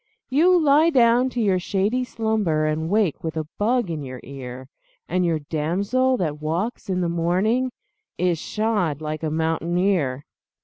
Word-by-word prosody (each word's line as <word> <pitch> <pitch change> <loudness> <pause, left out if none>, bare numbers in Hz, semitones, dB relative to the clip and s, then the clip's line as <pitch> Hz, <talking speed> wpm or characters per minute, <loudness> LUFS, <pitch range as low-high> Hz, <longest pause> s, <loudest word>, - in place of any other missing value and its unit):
You 350 +6 +5
lie 305 +1 +5
down 245 -3 +4
to 250 - -4
your 195 -5 +2
shady 205 +7 0
slumber 220 -10 0
And 155 +1 -1
wake 205 -5 +1
with 160 -1 -4
a 155 - -2
bug 230 -2 +1
in 155 -2 -4
your 130 -2 -7
ear, 130 -1 -8 0.4
And 180 0 0
your 170 -2 +1
damsel 195 - 0
that 150 -5 -2
walks 175 +10 -3
in 185 -1 0
the 175 - 0
morning 185 +10 +1 0.5
Is 175 -2 +1
shod 205 -10 -1
like 155 0 -4
a 160 - -1
mountaineer. 165 -2 0
180 Hz, 160 wpm, -23 LUFS, 155-225 Hz, 0.5 s, You